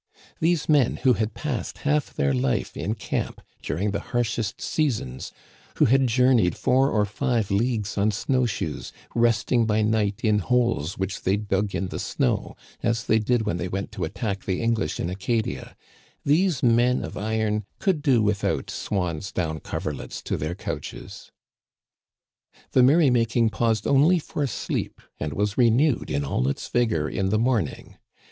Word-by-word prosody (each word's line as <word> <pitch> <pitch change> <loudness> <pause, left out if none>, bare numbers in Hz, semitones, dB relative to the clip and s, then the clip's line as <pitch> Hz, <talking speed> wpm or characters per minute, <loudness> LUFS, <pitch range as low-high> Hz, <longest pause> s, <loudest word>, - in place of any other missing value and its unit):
These 165 -1 +1
men, 145 -6 +3
who 130 - +6
had 110 -1 -2
passed 145 -6 -4
half 150 0 +1
their 70 -1 0
life 65 0 -1
in 105 +6 -2
camp 105 - -3 0.2
during 95 +8 -1
the 100 - -1
harshest 115 -1 -2
seasons; 110 - -2 0.4
who - - +4
had 135 +2 +4
journeyed 120 -6 +3
four 130 +2 +3
or 105 -5 +2
five 115 -1 -1
leagues 105 -1 0
on 105 +2 +3
snow 125 +4 +1
shoes, 80 -8 -4 0.2
rest 115 -2 +2
ing 120 -3 +3
by 110 0 +2
night 105 -2 0
in 105 -2 +3
holes 115 -7 0
which 95 +1 -3
they 95 +2 +1
dug 100 -1 -1
in 95 - -2
the - - -5
snow - - -1 0.3
(as 115 -1 0
they 110 0 +3
did 115 +1 +1
when 105 -5 -1
they 90 +1 -3
went 95 +2 -4
to 105 -4 -5
attack 100 +4 -3
the 95 -2 -1
English 115 -9 0
in - - -1
Aca 100 +5 0
dia), - - -7 0.5
these 155 0 +2
men 120 +1 +3
of - - -8
iron 110 0 -1
could 185 -7 0
do 130 -7 +3
without 105 -1 0
swan's 90 -2 -3
down 80 -3 -2
coverlets - - -5
to - - -2
their 80 +4 -3
couches. - - -7 1.4
The 130 - +5
merry 140 +2 +5
making 115 -1 +2
paused 110 -3 0
only 145 +6 +5
for 145 -3 -2
sleep, 120 - -3 0.2
and 75 -1 -3
was 105 +4 -1
re 120 -2 +6
newed 130 +3 +2
in 70 0 -1
all 65 -2 0
its 70 - -2
vigor 110 -11 +1
in 95 +6 -1
the 110 - +2
morning. 110 - -1
110 Hz, 170 wpm, -25 LUFS, 100-125 Hz, 1.4 s, who